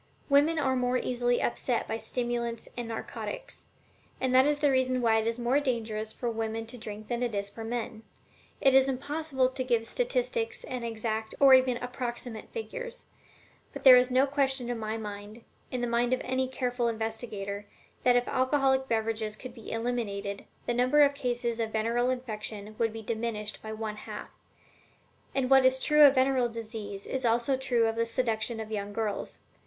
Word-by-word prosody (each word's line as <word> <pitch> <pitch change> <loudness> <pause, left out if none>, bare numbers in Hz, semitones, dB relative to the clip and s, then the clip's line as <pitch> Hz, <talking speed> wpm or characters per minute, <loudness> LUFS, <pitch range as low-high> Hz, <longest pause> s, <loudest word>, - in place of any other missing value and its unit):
Women 290 +4 +4
are 265 -3 +1
more 250 0 +1
easily 245 -1 0
upset 240 0 0
by 225 - -2
stimulants 240 -2 -3
and 240 -1 -4
narcotics, 365 - -6 0.5
and 260 -1 0
that 260 +2 +6
is 295 0 +2
the 290 -2 +3
reason 255 -1 +2
why 225 -2 +3
it 220 - -1
is 230 +1 -1
more 245 +3 +2
dangerous 220 -5 -2
for 240 - -5
women 225 -1 -2
to 235 +2 -8
drink 215 -1 -7
than 240 0 -2
it 240 -3 -1
is 200 0 -2
for 225 - -8
men. 230 -1 -4 0.6
It 270 - +4
is 265 0 +6
impossible 270 0 0
to 260 0 -3
give 235 -3 +1
statistics - - -1
and 250 -2 -5
exact 220 -1 -3
or 275 -1 +8
even 255 -1 +5
approximate 245 -2 -5
figures. 485 +1 -6 0.7
But - - -8
there 260 -2 +11
is 250 0 +4
no 255 +2 +4
question 270 -3 0
in 240 - -3
my 220 0 -3
mind, 210 +1 -8 0.3
in 250 - -3
the - - +1
mind 240 +1 +1
of 255 - 0
any 260 +1 0
careful 245 -2 -1
investigator, 220 -3 -4 0.3
that 245 -1 +4
if 245 0 +2
alcoholic 265 0 +2
beverages 220 -2 -1
could 250 +2 -9
be 230 -3 -10
eliminated, 215 -4 -3 0.2
the 240 - 0
number 255 +5 +4
of 285 0 +4
cases 240 -3 -2
of 225 -1 -2
venereal 230 +3 +1
infection 215 -4 -4
would 225 -1 +2
be 225 0 -7
diminished 220 -1 -3
by 220 - -8
about 220 0 -6
one 215 -1 -3
half. - - -8 1.1
And 265 -2 +1
what 265 0 +6
is 260 0 +5
true 300 +3 +3
of 275 - +3
venereal 260 -2 +3
disease 215 -3 -6
is 265 0 -3
also 235 +3 +2
true 255 -3 +1
of 225 0 0
the 230 0 0
seduction 230 -1 -1
of 220 0 -6
young 205 -1 -3
girls. 215 -2 -3
240 Hz, 185 wpm, -29 LUFS, 225-260 Hz, 1.1 s, there